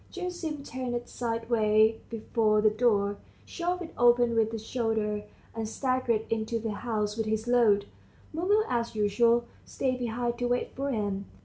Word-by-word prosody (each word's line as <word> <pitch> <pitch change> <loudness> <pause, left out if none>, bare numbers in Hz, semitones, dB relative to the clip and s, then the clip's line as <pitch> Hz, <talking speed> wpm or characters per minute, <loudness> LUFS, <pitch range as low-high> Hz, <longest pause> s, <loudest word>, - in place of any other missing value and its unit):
Gerasim 350 -5 -4
turned 250 -2 -3
sideways 225 -2 +2
before 220 -1 +1
the 215 0 +4
door, 205 -3 +2 0.3
shoved 355 +1 -2
it 325 - -10
open 240 0 +4
with 225 -1 +2
his 220 -1 -6
shoulder, 220 -3 -1 0.3
and 225 -1 -4
staggered 255 -3 0
into 225 +1 -1
the 225 -1 -3
house 210 -1 -2
with 225 -1 -2
his 220 +1 -1
load. 225 -5 +4 0.5
Mumu, 395 +7 +2
as 235 -2 -1
usual, 235 +3 +3 0.2
stayed 255 -1 -2
behind 240 0 -2
to 245 - 0
wait 245 0 -1
for 275 +2 -2
him. 205 -5 -2
230 Hz, 150 wpm, -28 LUFS, 215-245 Hz, 0.5 s, the